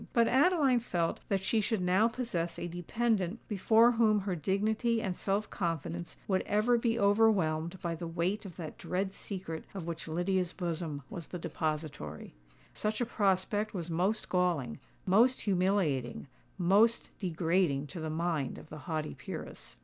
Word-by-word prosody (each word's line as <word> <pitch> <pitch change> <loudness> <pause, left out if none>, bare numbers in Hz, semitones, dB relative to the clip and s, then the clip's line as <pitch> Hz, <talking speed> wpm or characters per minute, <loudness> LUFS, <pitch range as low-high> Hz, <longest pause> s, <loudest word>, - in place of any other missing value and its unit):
But 230 -1 +4
Adeline 280 -3 +4
felt 175 -8 -1
that 195 -2 +1
she 220 +2 +2
should 220 0 0
now 185 +5 +4
possess 225 -9 -3
a - - -4
dependant 190 +3 -1
before 220 +3 +5
whom 220 -3 +3
her 190 -2 -2
dignity 215 - +1
and 190 -4 -2
self 200 +3 -1
confidence 170 -1 -3
would 190 -2 +2
ever 215 +4 +3
be 230 0 +1
overwhelmed 190 -6 +3
by 170 -1 -1
the 165 +1 -5
weight 175 +5 -1
of 190 -4 -9
that 160 -4 -7
dread 190 +1 -2
secret 180 -7 -6
of 185 -4 -4
which 165 -1 -5
Lydia's 175 +2 0
bosom 165 -5 -3
was 170 -4 -6
the 180 - -5
depository. 150 - -4 0.4
Such 215 0 -2
a 245 - +1
prospect 205 -1 0
was 170 -2 -4
most 190 +7 0
galling—most 180 - +1
humiliating—most 185 - +1
degrading 170 -5 +1
to 170 +4 -8
the 160 0 -3
mind 160 -4 -1
of - - -12
the 155 - -8
haughty 155 -1 -2
peeress. - - -8
185 Hz, 150 wpm, -31 LUFS, 165-215 Hz, 0.4 s, before